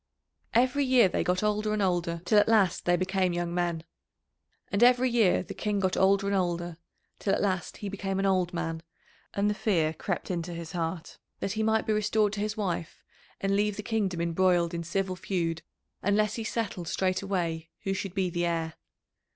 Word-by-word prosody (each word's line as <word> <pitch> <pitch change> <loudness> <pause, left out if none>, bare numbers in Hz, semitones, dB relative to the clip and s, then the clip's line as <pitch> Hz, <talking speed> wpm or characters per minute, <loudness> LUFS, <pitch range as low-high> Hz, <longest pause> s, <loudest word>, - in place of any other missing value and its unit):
Every 255 +4 +3
year 255 -5 +5
they - - -1
got 180 +2 0
older 210 0 +1
and 215 - 0
older 175 -3 0
till 210 +3 +5
at 205 - +3
last 200 -6 +3
they 175 - +4
became 185 0 0
young 175 0 -2
men. 175 -2 -1 0.9
And 200 - 0
every 250 +1 +5
year 225 -8 +3
the - - -7
King 210 -1 -1
got 185 -1 +1
older 195 +1 +3
and 200 0 +1
older 175 -2 -1 0.4
till 195 - +1
at - - -2
last 190 -3 -1
he 205 - -5
became 195 -1 -3
an 195 - 0
old 185 -2 +2
man, 165 -2 -3 0.5
and 200 +1 +2
the 210 - +2
fear 170 -7 +1
crept 190 +3 -3
into 175 -1 -3
his 165 -1 -7
heart 165 -1 -4 0.2
that 195 - -2
he 220 +1 -2
might 220 0 +2
be 215 - +1
restored 210 0 +2
to 210 - -4
his 210 +1 -2
wife 175 -5 -3 0.4
and 195 0 +1
leave 205 0 +1
the 210 - -5
kingdom 200 -7 -1
embroiled 170 0 +2
in 170 0 -3
civil 185 +2 -1
feud 170 -4 -2 0.4
unless 210 +1 +2
he 225 - -4
settled 210 -6 -3
straightway 185 -4 -1
who 195 - 0
should 190 -1 -4
be 185 -2 0
the 175 0 0
heir. 165 -1 -1
190 Hz, 195 wpm, -28 LUFS, 175-210 Hz, 0.9 s, year